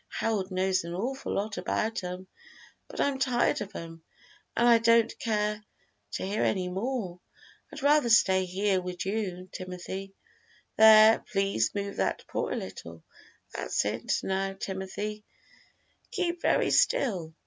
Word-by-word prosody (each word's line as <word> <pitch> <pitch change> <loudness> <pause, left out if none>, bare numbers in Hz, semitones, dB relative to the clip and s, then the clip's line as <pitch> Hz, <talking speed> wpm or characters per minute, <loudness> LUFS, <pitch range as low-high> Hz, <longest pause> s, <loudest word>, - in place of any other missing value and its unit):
Harold 210 -4 -1
knows 185 0 0
an 170 +1 -6
awful 255 +8 -3
lot 205 +1 -2
about 220 -2 -2
'em, 180 +1 -6 0.6
but - - -10
I'm 280 -1 +1
tired 250 -2 +1
of 205 0 -7
'em, 165 0 -8 0.6
an' 235 - +3
I 235 -1 +6
don't 230 0 +4
care 210 -1 -1 0.5
to - - -3
hear 200 +3 -2
any 185 -2 0
more. 195 -2 -3 0.5
I'd - - -9
rather 290 -3 +4
stay 190 -4 +4
here 190 +1 0
wid 180 0 -5
you, 190 -3 -3
Timothy. 190 +1 -7 0.6
There, 220 0 +8
please 195 - 0
move 200 0 -4
that - - -1
paw - - -3
a - - -2
little 85 -3 -8 0.5
that's - - -1
it; 110 +3 -1
now, 195 0 -1
Timothy, 195 +2 -5 0.9
keep 355 -7 -2
very - - +2
still! 175 - +1
195 Hz, 140 wpm, -28 LUFS, 185-225 Hz, 0.9 s, There